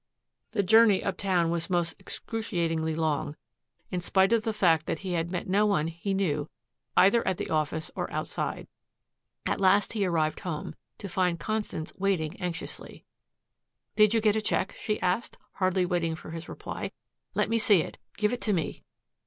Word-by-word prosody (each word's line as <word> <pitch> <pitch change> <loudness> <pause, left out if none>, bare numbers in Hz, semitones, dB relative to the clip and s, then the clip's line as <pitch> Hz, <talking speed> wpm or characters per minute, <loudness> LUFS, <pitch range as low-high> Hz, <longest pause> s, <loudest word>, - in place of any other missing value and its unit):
The 205 -3 +2
journey 220 0 +6
uptown 185 -3 +1
was 170 +1 -1
most 175 -2 +1
excruciatingly 170 -8 -2
long, 155 -2 -1 0.6
in 180 - -1
spite 190 +4 +3
of 225 -2 +3
the 225 - +1
fact 165 -7 +3
that - - -1
he 185 - -1
had 170 0 0
met 180 - -3
no 205 +3 +3
one 165 -6 +1
he 170 +4 -3
knew 155 -6 0 0.5
either 200 +5 +5
at 185 - +1
the - - -4
office 155 0 -1
or - - -3
outside. - - -3 0.8
At - - 0
last 195 +2 +4
he 210 -3 0
arrived 160 -4 +1
home, 170 -6 -4 0.2
to 200 - -6
find 180 -2 0
Constance 215 -7 -3
waiting 185 -6 0
anxiously. 175 -1 -5 0.9
"Did 215 +1 +5
you 225 - +3
get 215 -1 +3
a 220 - +1
check?" 205 -2 0
she 215 - -1
asked, 185 +6 -1
hardly 185 -1 +1
waiting 170 -2 0
for 160 - -10
his 165 0 -7
reply. - - -5 0.4
"Let - - +2
me 230 0 +1
see 210 -7 +5
it. - - -9 0.2
Give 210 +2 +1
it 245 - -3
to 210 - +1
me." 165 -4 -2
185 Hz, 175 wpm, -28 LUFS, 165-205 Hz, 0.9 s, journey